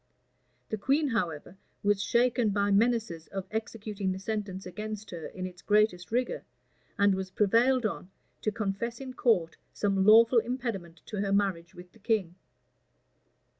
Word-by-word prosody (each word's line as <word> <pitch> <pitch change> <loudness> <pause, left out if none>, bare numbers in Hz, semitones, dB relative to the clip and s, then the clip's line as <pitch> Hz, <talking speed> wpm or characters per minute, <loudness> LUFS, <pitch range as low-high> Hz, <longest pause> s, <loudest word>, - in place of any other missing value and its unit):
[*] - - -43
The 215 - -2
queen, 280 +6 +2
however, 180 - -2 0.3
was 205 -1 +2
shaken 240 +1 +2
by 200 0 +1
menaces 215 -6 +1
of 195 -1 -5
executing 215 -3 -3
the 185 - -3
sentence 195 -1 -4
against 210 +3 -6
her 170 -3 -6
in 185 -1 -6
its 180 -1 -9
greatest 210 -4 +2
rigor, 245 +2 -1 0.5
and 200 -2 +4
was 190 0 -3
prevailed 230 +6 +3
on 195 -3 -3 0.3
to 215 - 0
confess 215 +3 -3
in 265 -1 -7
court 190 -11 +1 0.2
some 195 -2 +1
lawful 230 +3 +7
impediment 225 -9 -4
to 210 - -6
her 200 0 -1
marriage 190 -3 0
with 180 0 -12
the 225 - -21
king. 205 -5 0
205 Hz, 155 wpm, -29 LUFS, 190-230 Hz, 0.5 s, lawful